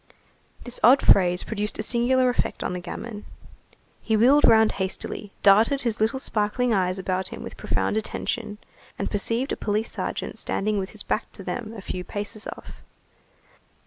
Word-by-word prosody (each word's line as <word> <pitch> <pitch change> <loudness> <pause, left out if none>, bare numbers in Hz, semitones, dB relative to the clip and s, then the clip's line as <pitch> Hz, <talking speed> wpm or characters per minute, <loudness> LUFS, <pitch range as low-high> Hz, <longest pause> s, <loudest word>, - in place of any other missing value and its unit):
This 245 - -4
odd 255 +5 +6
phrase 180 -2 +5
produced 210 -1 -3
a 215 - -2
singular 250 +3 +2
effect 245 - -2
on - - -2
the 180 - -3
gamin. 210 +4 -7 0.8
He 220 -1 +1
wheeled 265 +7 +6
round 220 -1 +6
hastily, 195 +2 -3
darted 220 +8 +5
his 230 -3 -1
little 220 +5 +1
sparkling 235 0 0
eyes 185 -2 +1
about 185 0 -1
him - - -8
with - - -8
profound 215 - -1
attention, 210 -1 -3 0.4
and - - -3
perceived 230 +5 0
a - - 0
police 215 +2 -1
sergeant - - -4
standing 210 0 -1
with 190 0 -4
his 215 - -6
back 215 - -2
to 195 - -9
them 220 +4 -5
a - - -7
few 180 -1 -5
paces 205 +3 -4
off. - - -10
215 Hz, 170 wpm, -25 LUFS, 195-235 Hz, 0.8 s, odd